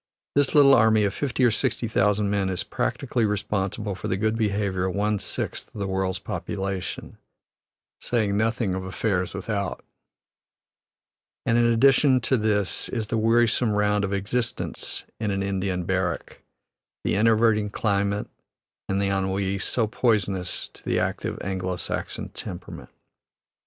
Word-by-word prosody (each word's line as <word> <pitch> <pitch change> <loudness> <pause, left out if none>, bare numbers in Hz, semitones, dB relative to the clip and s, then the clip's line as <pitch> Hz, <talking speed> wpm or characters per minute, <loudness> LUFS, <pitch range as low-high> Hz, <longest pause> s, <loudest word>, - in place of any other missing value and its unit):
This 145 0 +2
little 140 -2 +8
army 110 -3 +5
of 100 -1 +1
fifty 135 0 -1
or 120 - +5
sixty 115 +2 0
thousand 105 -1 +2
men 100 -2 +1
is 90 -2 -1
practically 120 - -1
responsible 105 0 -1
for 90 - -5
the 95 - 0
good 110 +2 +1
behavior 100 -4 0
of 95 - -3
one 105 0 +1
sixth - - -4
of - - -6
the 100 - -1
world's 95 -1 -1
population, 95 -2 -4 0.8
saying 110 -4 0
nothing 110 -2 +1
of 95 0 -3
affairs 95 0 -1
without. - - -3 1.6
And 115 - +2
in 120 0 +4
addition 130 +3 +5
to 130 +3 +2
this 105 -3 0
is 110 -3 -3
the 115 - 0
wearisome 115 0 +3
round 105 0 +2
of 100 - -1
existence 105 +4 -2
in 110 -2 -1
an 95 -1 -1
Indian 95 -2 -1
barrack, 90 -2 -2 0.6
the - - +1
enervating 110 0 +3
climate 100 -1 0 0.6
and 95 0 +1
the 100 0 +1
ennui, 95 0 -1
so 115 +4 +1
poisonous 105 -5 0
to - - -14
the - - 0
active - - -2
Anglo 95 -1 -2
Saxon - - -4
temperament. 90 - -8
105 Hz, 145 wpm, -25 LUFS, 95-115 Hz, 1.6 s, little